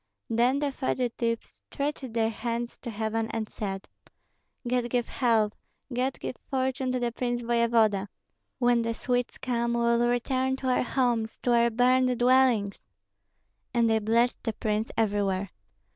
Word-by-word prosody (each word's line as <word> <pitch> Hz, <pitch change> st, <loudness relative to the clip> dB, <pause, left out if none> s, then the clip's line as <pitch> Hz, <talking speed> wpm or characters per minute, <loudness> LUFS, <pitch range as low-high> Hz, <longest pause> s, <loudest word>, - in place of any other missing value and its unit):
Then 240 Hz, +4 st, +3 dB
the 285 Hz, 0 st, 0 dB
fugitives 240 Hz, -4 st, -2 dB
stretched 280 Hz, -4 st, -3 dB
their 225 Hz, -1 st, +1 dB
hands 235 Hz, +1 st, -3 dB
to 245 Hz, -, -6 dB
heaven 220 Hz, 0 st, -2 dB
and 220 Hz, -1 st, -3 dB
said, 195 Hz, -3 st, -5 dB, 0.8 s
"God 245 Hz, 0 st, 0 dB
give 245 Hz, -1 st, 0 dB
health, 225 Hz, -4 st, +2 dB, 0.4 s
God 255 Hz, +2 st, -1 dB
give -, -, -5 dB
fortune 260 Hz, -1 st, 0 dB
to 255 Hz, -, 0 dB
the 240 Hz, -1 st, -1 dB
prince 240 Hz, 0 st, -2 dB
voevoda! 230 Hz, -4 st, +2 dB, 0.5 s
When 245 Hz, -2 st, +3 dB
the 230 Hz, 0 st, -2 dB
Swedes 245 Hz, 0 st, -1 dB
come 235 Hz, -2 st, -1 dB
we -, -, 0 dB
will 235 Hz, 0 st, +3 dB
return 260 Hz, +2 st, 0 dB
to 265 Hz, -1 st, -3 dB
our 250 Hz, -, +3 dB
homes, 240 Hz, -4 st, 0 dB
to 245 Hz, -, +3 dB
our 235 Hz, 0 st, +4 dB
burned 250 Hz, +2 st, +3 dB
dwellings." 245 Hz, -5 st, +3 dB, 0.9 s
And 235 Hz, -1 st, +4 dB
they 220 Hz, 0 st, +3 dB
blessed 230 Hz, +3 st, +1 dB
the 225 Hz, -, -2 dB
prince 215 Hz, +1 st, -1 dB
everywhere. 200 Hz, -3 st, 0 dB
235 Hz, 150 wpm, -27 LUFS, 225-250 Hz, 0.9 s, our